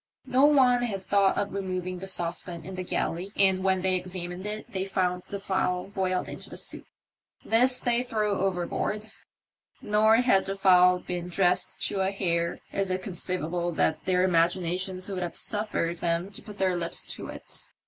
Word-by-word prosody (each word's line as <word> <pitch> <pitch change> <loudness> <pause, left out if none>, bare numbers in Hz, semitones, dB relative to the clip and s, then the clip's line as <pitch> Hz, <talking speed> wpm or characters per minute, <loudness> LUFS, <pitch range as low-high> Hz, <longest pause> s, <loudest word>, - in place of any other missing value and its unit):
No 260 +2 +4
one 255 -4 +5
had 200 -6 -2
thought 200 -1 +3
of 200 - -1
removing 185 -2 -3
the 195 - -5
saucepan 175 -1 -3
in 190 - -7
the 185 - -4
galley, 180 +1 -2
and 190 -1 +3
when 190 -1 +2
they 190 0 +2
examined 180 +1 -5
it 215 +1 -6
they 190 -1 -1
found 185 -2 0
the 200 - -5
fowl 185 -2 -1
boiled 185 -2 -1
into - - -8
soup. - - -3 0.6
This 250 +3 +3
they 240 0 +2
threw 215 -4 -1
overboard; 195 +3 -1 0.7
nor, 215 +1 +4
had 230 -6 +3
the 195 - -2
fowl 180 -2 +6
been 175 -1 -4
dressed 180 0 +1
to 200 - -3
a 190 - +2
hair, 170 -3 -1
is 195 -1 0
it 185 0 -1
conceivable 175 -2 -2
that 160 0 +1
their 185 -1 +2
imaginations 185 +1 +1
would 190 -2 -3
have 175 -1 -4
suffered 205 -5 -2
them 170 +3 -1
to 195 - -6
put 210 -1 -11
their 185 -2 +1
lips 170 -1 -2
to - - -7
it. - - -7
185 Hz, 175 wpm, -27 LUFS, 180-200 Hz, 0.7 s, fowl